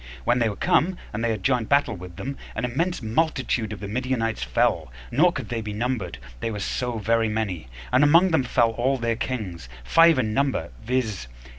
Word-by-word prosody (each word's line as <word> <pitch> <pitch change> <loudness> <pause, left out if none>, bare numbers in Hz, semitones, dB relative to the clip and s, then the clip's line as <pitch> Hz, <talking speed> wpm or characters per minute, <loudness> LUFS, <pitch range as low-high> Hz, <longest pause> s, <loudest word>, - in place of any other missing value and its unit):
When 125 - +2
they 115 -2 +2
were 100 - -5
come, 180 - +2 0.2
and 105 +2 -3
they 120 - +1
had 110 -4 -2
joined 125 -4 +1
battle 140 -5 +3
with 90 -1 -10
them, 135 +9 -5 0.2
an 110 - -1
immense 165 +5 -1
multitude 125 -3 0
of 105 - -6
the 100 - -6
Midianites 115 0 -1
fell; - - +1 0.2
nor 160 +8 +4
could 130 - -6
they 115 -2 -2
be 105 -1 -5
numbered, 110 - -2 0.2
they - - -2
were 105 -2 -4
so 125 +4 -2
very 115 +1 +1
many: 100 - -2 0.2
and 130 - +5
among 170 +5 +6
them 160 - +3
fell 120 -2 +2
all 125 +4 0
their 115 -1 0
kings, 95 - -4
five 165 - +5
in 110 -4 0
number, 135 -10 0
viz. 110 - -1
115 Hz, 200 wpm, -24 LUFS, 105-130 Hz, 0.2 s, among